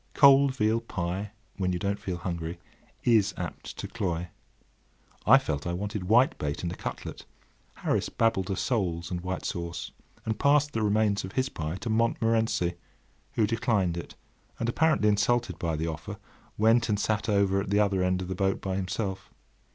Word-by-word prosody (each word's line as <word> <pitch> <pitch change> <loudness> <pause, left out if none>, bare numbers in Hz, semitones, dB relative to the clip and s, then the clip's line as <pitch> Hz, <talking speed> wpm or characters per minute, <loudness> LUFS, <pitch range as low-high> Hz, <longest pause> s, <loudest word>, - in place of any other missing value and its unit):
Cold 140 -1 +6
veal 110 -1 +2
pie, 95 -2 -3 0.3
when 95 -2 0
you 90 - 0
don't 100 +3 -1
feel 90 -2 -4
hungry, 85 -1 -4 0.5
is 110 -4 +3
apt - - -6
to - - -5
cloy. 90 -6 -3 1.0
I - - +9
felt 70 +2 -2
I 85 - -1
wanted 100 0 -3
whitebait 110 - +2
and 85 - -1
a - - -5
cutlet; - - -6 0.5
Harris - - -1
babbled 115 -5 +1
of 95 - -1
soles 85 -8 -1
and 90 -1 -2
white 95 +1 -4
sauce, 85 0 -4 0.3
and 110 -1 -2
passed 145 +1 +3
the 115 - -1
remains 105 -1 +2
of 95 - -7
his 130 0 0
pie 80 - -4
to 120 - -3
Montmorency, 115 -5 +1 0.6
who 110 - +3
declined 110 -6 +1
it, 85 - -7 0.4
and, 115 - -2
apparently 155 -2 +3
insulted 110 +4 +1
by 85 -2 -1
the 80 +1 -2
offer, 80 -2 -5 0.4
went 115 +2 +4
and 105 -1 +1
sat 110 +1 0
over 100 -1 +3
at 100 - -5
the 100 +1 +3
other 100 -3 +2
end 90 0 +1
of - - -6
the 95 - -2
boat 95 +1 0
by 95 -1 -2
himself. 95 +1 -3
100 Hz, 175 wpm, -28 LUFS, 90-115 Hz, 1.0 s, I